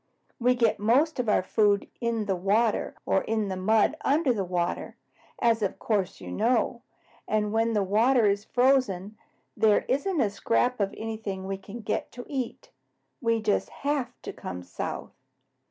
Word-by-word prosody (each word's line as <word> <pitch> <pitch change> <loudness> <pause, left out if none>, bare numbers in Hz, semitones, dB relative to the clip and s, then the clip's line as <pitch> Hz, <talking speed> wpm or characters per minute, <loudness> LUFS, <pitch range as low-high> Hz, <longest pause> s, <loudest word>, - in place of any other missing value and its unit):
We 250 +1 +3
get 230 -3 +2
most 265 +9 +2
of 240 -3 0
our 210 - +3
food 205 0 +2
in 230 -2 -1
the 195 -2 0
water 205 +5 +1
or 195 - +2
in 220 -2 -1
the 190 - -2
mud 215 +9 +2
under 285 -2 +3
the 205 -4 -1
water, 175 -1 -2 0.4
as 230 -1 +3
of 200 - -1
course 200 -4 -1
you - - -8
know, 235 +1 +1 0.5
and 210 0 0
when 225 +1 +2
the 210 -2 +2
water 225 +5 +3
is 200 0 +2
frozen, 235 -6 +1 0.4
there 215 -1 +3
isn't 310 +7 0
a 215 -6 +2
scrap 245 +4 +1
of 200 -1 +1
anything 215 -4 -5
we 195 0 -4
can 205 +4 -9
get 210 - -2
to 245 0 -8
eat. 260 -4 -5 0.5
We 230 -2 +1
just 210 -1 +1
HAVE 285 -2 -2
to - - -6
come 90 0 -7
south. 90 -1 -5
220 Hz, 170 wpm, -27 LUFS, 200-245 Hz, 0.5 s, We